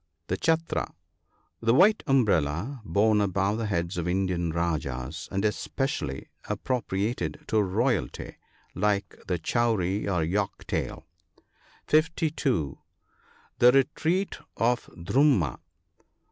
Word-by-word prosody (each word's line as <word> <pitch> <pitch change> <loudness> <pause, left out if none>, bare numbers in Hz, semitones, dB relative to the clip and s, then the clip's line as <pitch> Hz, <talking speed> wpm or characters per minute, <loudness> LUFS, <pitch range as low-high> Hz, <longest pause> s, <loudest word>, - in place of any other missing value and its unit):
The 90 - +1
chaltra. 165 - 0 0.4
— - - -45 0.3
The 115 +1 +3
white 205 +8 +5
umbrella 110 - +1
borne 105 +1 +3
above 100 +2 +1
the 110 - -1
heads 85 -2 -1
of 85 - -2
Indian 90 -2 0
rajahs, 80 -3 -2
and 95 +2 0
especially 105 - -2 0.2
appropriated 120 +3 -2
to 110 -2 +3
royalty, 110 +4 -1 0.4
like 100 0 0
the 90 - 0
Chowri 105 -4 0
or 90 -5 +1
Yak 95 +4 -2
tail. - - -3 0.8
(52.) 155 - +1 0.8
The 120 +1 +8
retreat 160 +8 +1 0.2
of 120 +1 +1
Dhurmma. 95 - +2
105 Hz, 105 wpm, -27 LUFS, 90-130 Hz, 0.8 s, The